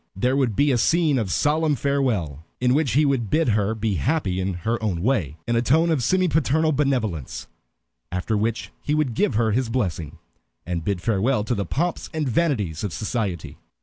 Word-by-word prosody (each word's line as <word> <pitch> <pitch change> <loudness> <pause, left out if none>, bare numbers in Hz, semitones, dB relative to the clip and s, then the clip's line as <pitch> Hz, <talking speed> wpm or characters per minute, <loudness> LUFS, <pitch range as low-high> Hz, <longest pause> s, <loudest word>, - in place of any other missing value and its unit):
There 125 +7 +1
would 130 -6 +1
be 145 +6 +3
a 125 - +2
scene 160 -1 +3
of 100 -5 -2
solemn 150 - +2
farewell, 115 - -1 0.2
in 125 0 +2
which 140 -5 +1
he 150 +4 +4
would 130 -7 0
bid 160 +1 +2
her 105 0 +1
be 110 -3 -1
happy 100 - 0
in 95 0 -2
her 115 +1 0
own 90 -6 -2
way, 95 - 0
in 120 - +1
a 115 - +3
tone 160 +7 +3
of 155 -5 +1
semi 185 +8 +2
paternal 155 0 +2
benevolence, 125 - -1 0.6
after 90 +5 -1
which 115 +2 -2
he 150 - -1
would 150 -6 0
give 135 - +1
her 110 0 +2
his 120 +2 0
blessing, 85 - -2 0.5
and 85 -2 -3
bid 100 -2 -2
farewell 110 +3 +1
to 115 - -1
the 100 -5 -2
pomps 170 - -2
and 155 -3 -1
vanities 110 - 0
of 100 -5 -3
society. 105 -6 -3
115 Hz, 195 wpm, -23 LUFS, 100-140 Hz, 0.6 s, he